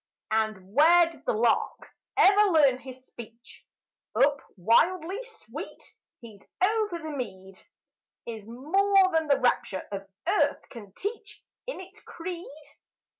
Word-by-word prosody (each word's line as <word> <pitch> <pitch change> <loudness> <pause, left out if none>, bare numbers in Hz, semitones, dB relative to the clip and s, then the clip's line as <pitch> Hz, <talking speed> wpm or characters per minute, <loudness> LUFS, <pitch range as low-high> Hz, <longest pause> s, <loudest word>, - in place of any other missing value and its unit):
And 215 -3 -1
where 335 +4 +6
did 310 - -18
the - - +2
lark 225 +1 0 0.3
ever 410 +1 +6
learn 285 -7 +4
his 260 0 -12
speech? 235 0 -13 0.5
Up, 285 0 +3 0.2
wildly 340 - +2
sweet, 475 -2 -11 0.3
he's 220 -4 -13 0.2
over 420 -1 +1
the 315 -2 -7
mead! 190 -6 -7 0.6
Is 220 -3 -8
more 375 - +2
than 320 -1 +1
the 280 - +3
rapture 220 -6 0
of 195 -1 -6 0.2
earth 395 +4 +1
can 210 -5 -11
teach 425 - -7 0.2
In - - -5
its 380 +3 -12
creed? 345 -1 -7
295 Hz, 125 wpm, -27 LUFS, 225-375 Hz, 0.6 s, where